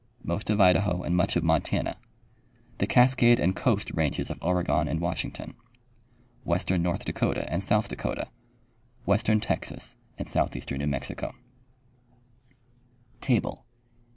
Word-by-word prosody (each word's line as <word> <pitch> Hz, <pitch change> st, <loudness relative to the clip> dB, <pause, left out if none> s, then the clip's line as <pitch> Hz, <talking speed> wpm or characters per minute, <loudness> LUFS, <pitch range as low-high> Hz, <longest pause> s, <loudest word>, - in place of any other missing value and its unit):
Most 105 Hz, -, -3 dB
of 105 Hz, 0 st, +2 dB
Idaho 90 Hz, -1 st, +4 dB
and 85 Hz, -, 0 dB
much 95 Hz, +4 st, +2 dB
of 85 Hz, -, +2 dB
Montana. 80 Hz, -1 st, +1 dB, 0.8 s
The -, -, +1 dB
Cascade 125 Hz, -1 st, +5 dB
and 95 Hz, +2 st, +2 dB
Coast 105 Hz, -3 st, 0 dB
ranges 80 Hz, -3 st, -1 dB
of -, -, -6 dB
Oregon 90 Hz, 0 st, +1 dB
and 80 Hz, -, -1 dB
Washington. 85 Hz, +1 st, -3 dB, 0.9 s
Western 90 Hz, +1 st, +1 dB
North 85 Hz, 0 st, -1 dB
Dakota -, -, -1 dB
and -, -, 0 dB
South -, -, +2 dB
Dakota. -, -, -3 dB, 0.8 s
Western 110 Hz, +2 st, +3 dB
Texas 115 Hz, -, -4 dB, 0.2 s
and -, -, -5 dB
southeastern 70 Hz, -, -1 dB
New 70 Hz, -, -1 dB
Mexico. 70 Hz, -3 st, -3 dB
90 Hz, 120 wpm, -27 LUFS, 85-105 Hz, 0.9 s, Cascade